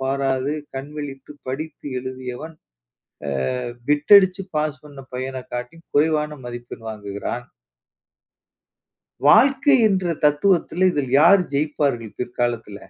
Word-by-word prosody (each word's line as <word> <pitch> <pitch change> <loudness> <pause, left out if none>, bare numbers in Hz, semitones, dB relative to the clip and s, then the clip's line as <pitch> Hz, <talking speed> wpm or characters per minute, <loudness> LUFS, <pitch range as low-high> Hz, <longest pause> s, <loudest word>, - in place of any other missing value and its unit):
பாராது 135 +1 0 0.2
கண்விழித்து 140 0 -7
படித்து 145 +3 -6
எழுதியவன் 130 +4 -7 1.0
a - - -3 0.3
bit 150 +5 +2
அடிச்சு 190 -1 +3
பாஸ் 150 -2 -1
பண்ண 140 -2 -11
பையன 130 0 -5
காட்டியும் 125 +7 -6
குறைவான 150 -1 +1
மதிப்பெண் 120 -1 -8
வாங்குகிறான். 100 +2 -5 1.8
வாழ்க்கை 270 - +6
என்ற 185 -4 0
தத்துவத்தில, 175 +4 +3
இதில் 135 -4 -2
யார் 180 +4 +7
ஜெயிப்பார்கள் 140 -6 -1
பிற்காலத்தில? 120 -4 -2
145 Hz, 100 wpm, -22 LUFS, 125-160 Hz, 1.8 s, யார்